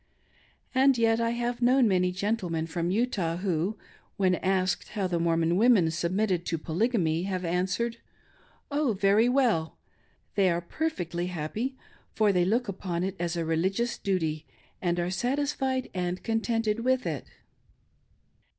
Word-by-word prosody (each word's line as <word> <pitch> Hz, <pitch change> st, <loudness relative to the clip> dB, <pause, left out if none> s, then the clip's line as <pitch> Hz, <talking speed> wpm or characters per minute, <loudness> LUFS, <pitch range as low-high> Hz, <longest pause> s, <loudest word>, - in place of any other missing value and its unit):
And 265 Hz, 0 st, +4 dB
yet 225 Hz, 0 st, +3 dB
I 230 Hz, -, +1 dB
have 240 Hz, +1 st, -2 dB
known 250 Hz, +1 st, +5 dB
maily 180 Hz, -2 st, +2 dB
gentlemen 180 Hz, -4 st, -1 dB
from 170 Hz, +1 st, -2 dB
Utah 190 Hz, -6 st, 0 dB
who, 185 Hz, +2 st, -1 dB, 0.4 s
when 185 Hz, -2 st, +3 dB
asked 185 Hz, 0 st, 0 dB
how 205 Hz, -3 st, -1 dB
the 175 Hz, -2 st, 0 dB
MorrrlcJn 165 Hz, 0 st, +2 dB
women 210 Hz, -7 st, +5 dB
submitted 180 Hz, +2 st, 0 dB
to 165 Hz, -, 0 dB
Poly 170 Hz, +9 st, 0 dB
^ -, -, -16 dB
gamy, 170 Hz, -6 st, +1 dB
have 185 Hz, -2 st, -2 dB
answered: 190 Hz, +7 st, -1 dB, 0.7 s
"Oh, 285 Hz, -4 st, +1 dB
very 205 Hz, +4 st, +3 dB
well. 240 Hz, -12 st, +1 dB, 0.6 s
They 195 Hz, -2 st, +3 dB
are 170 Hz, 0 st, +1 dB
perfectly 175 Hz, -, -3 dB
happy, 180 Hz, -, -3 dB, 0.4 s
for 210 Hz, -2 st, +3 dB
they 180 Hz, -1 st, +3 dB
look 230 Hz, +5 st, +1 dB
upon 180 Hz, -3 st, -3 dB
it 190 Hz, +1 st, -2 dB
as 170 Hz, 0 st, -2 dB
a 165 Hz, -, -1 dB
religious 190 Hz, +9 st, 0 dB
duty, 160 Hz, -6 st, -1 dB, 0.3 s
and 175 Hz, -1 st, 0 dB
are 175 Hz, +1 st, -1 dB
satisfied 260 Hz, +4 st, -1 dB
and 180 Hz, 0 st, -3 dB
contented 225 Hz, -1 st, 0 dB
with 255 Hz, +2 st, +1 dB
it." -, -, -3 dB
190 Hz, 150 wpm, -28 LUFS, 175-230 Hz, 0.7 s, known